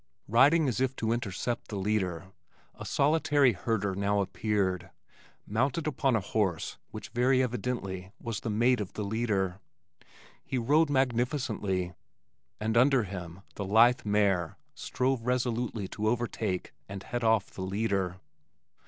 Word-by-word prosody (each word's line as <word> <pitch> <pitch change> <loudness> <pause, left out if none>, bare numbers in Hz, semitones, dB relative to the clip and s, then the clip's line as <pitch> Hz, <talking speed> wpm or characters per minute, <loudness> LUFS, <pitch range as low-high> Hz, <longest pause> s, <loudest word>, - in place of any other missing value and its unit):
Riding 140 +8 +5
as 120 -4 -1
if 130 0 +1
to 115 -2 -1
intercept 115 +1 -2
the 105 - -6
leader, 95 -3 -1 0.4
a - - -9
solitary 145 -3 +3
herder 100 0 -1
now 100 +1 +1
appeared, 95 -2 -1 0.6
mounted 130 +8 0
upon 135 -4 +1
a 110 - +1
horse 95 -4 -1
which - - -8
very 130 +3 +3
evidently 115 -7 -3
was 115 -3 -4
the 115 - -4
mate 120 +3 +2
of 100 - -6
the 105 - -4
leader. 100 -3 -1 0.8
He 130 - -3
rode 145 +6 +3
magnificently, 120 - 0 0.7
and 110 +1 -1
under 130 0 +5
him 90 -2 -7
the 100 - -5
lithe 115 +5 +5
mare 100 -5 +1 0.2
strove 130 -1 -1
resolutely 120 -4 -1
to 105 +1 -2
overtake 110 -5 -1 0.2
and 95 -1 -6
head 120 -1 -4
off 110 -3 +2
the - - -8
leader. 95 -2 -1
110 Hz, 135 wpm, -29 LUFS, 95-125 Hz, 0.8 s, Riding